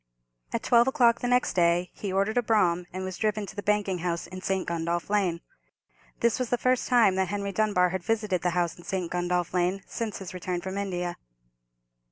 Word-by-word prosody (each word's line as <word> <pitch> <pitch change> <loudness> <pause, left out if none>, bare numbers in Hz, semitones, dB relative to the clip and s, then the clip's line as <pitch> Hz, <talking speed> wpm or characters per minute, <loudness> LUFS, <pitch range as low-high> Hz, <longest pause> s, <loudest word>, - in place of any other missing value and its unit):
At - - -2
twelve 235 0 +5
o'clock 245 -4 +4
the 245 - -2
next 250 0 +2
day 175 0 +2
he 200 - -5
ordered 200 +5 +1
a - - +2
brougham, 180 -6 +2
and 185 +1 -5
was 185 -1 -5
driven 215 -1 0
to - - -10
the 205 - -4
banking 205 -3 0
house 170 -1 -2
in 185 0 -9
St. 190 -1 -1
Gundolph 170 +2 -2
Lane. 185 -5 +1 0.8
This 235 0 +2
was 250 -2 -1
the 245 - +2
first 255 +1 +1
time 235 -6 +5
that 190 -1 +1
Henry 200 0 -3
Dunbar 195 -3 +2
had 185 0 -3
visited 210 -2 0
the 180 - +1
house 175 -2 +1
in - - -12
St. 185 -2 -3
Gundolph 175 -1 -1
Lane 180 +2 0
since 225 -3 -4
his 190 -2 -8
return 180 -1 -3
from 190 +1 -5
India. 180 -3 -3
190 Hz, 210 wpm, -27 LUFS, 180-215 Hz, 0.8 s, twelve